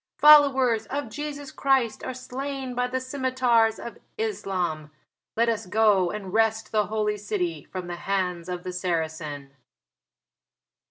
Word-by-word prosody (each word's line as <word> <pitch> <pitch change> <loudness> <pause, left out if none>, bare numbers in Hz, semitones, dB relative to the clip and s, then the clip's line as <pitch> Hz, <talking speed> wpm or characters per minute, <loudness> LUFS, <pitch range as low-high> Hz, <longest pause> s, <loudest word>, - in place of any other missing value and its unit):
"Followers 265 -7 +6
of 285 -1 -3
Jesus 290 +1 -6
Christ 265 -5 +1
are - - -3
slain 265 0 -5
by 250 0 0
the 260 +1 -2
scimitars 255 -4 +1
of 235 - -9 0.2
Islam. 185 -8 -2 0.5
Let 230 +1 +3
us 225 -3 -1
go 205 -2 +3
and 195 -1 -6
wrest 225 0 +1
the 210 -2 +1
Holy 210 -1 -1
City 180 -7 -3
from 185 -1 -6
the 175 0 -6
hands 180 -2 -2
of 180 -1 -4
the 185 - -5
Saracen." 160 -5 -3
220 Hz, 140 wpm, -25 LUFS, 180-255 Hz, 0.5 s, Followers